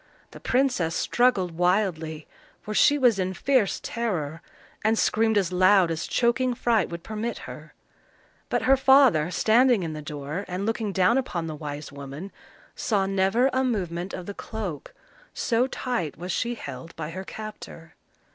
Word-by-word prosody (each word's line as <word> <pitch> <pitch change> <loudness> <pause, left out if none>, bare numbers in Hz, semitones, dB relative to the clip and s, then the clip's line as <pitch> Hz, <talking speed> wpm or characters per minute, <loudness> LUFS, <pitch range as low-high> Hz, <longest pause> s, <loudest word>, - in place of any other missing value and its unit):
The - - -11
princess 245 -11 +1
struggled 240 -8 +2
wildly, 165 -3 0 0.4
for 215 - -5
she 290 +7 +5
was 245 -7 +3
in 185 0 -1
fierce 255 -6 +1
terror, 170 -9 -3 0.4
and 220 +1 +2
screamed 220 0 +2
as 190 -3 +1
loud 185 -1 +5
as 160 - -3
choking 245 +1 +1
fright 235 -5 +1
would 170 0 -7
permit 220 +3 -4
her; - - -11 0.7
but - - 0
her 270 - +5
father, 265 - +5
standing 225 +4 +3
in 160 -2 -4
the 155 - -6
door, 150 +3 -5
and 185 +2 -3
looking 220 -1 -1
down 190 +7 +3
upon 180 -10 -3
the 160 - -5
wise 150 -1 -7
woman, 140 +7 -8 0.4
saw 200 -4 0
never 195 +7 +2
a 260 +1 +2
movement 185 -7 -2
of 180 - -6
the 200 - -6
cloak, 200 -9 -6 0.4
so 240 +2 +1
tight 245 - -3
was 180 +3 -5
she 240 +6 -1
held 140 - -9
by 160 0 -5
her 185 +3 -6
captor. 210 -6 -9
195 Hz, 160 wpm, -25 LUFS, 165-235 Hz, 0.7 s, she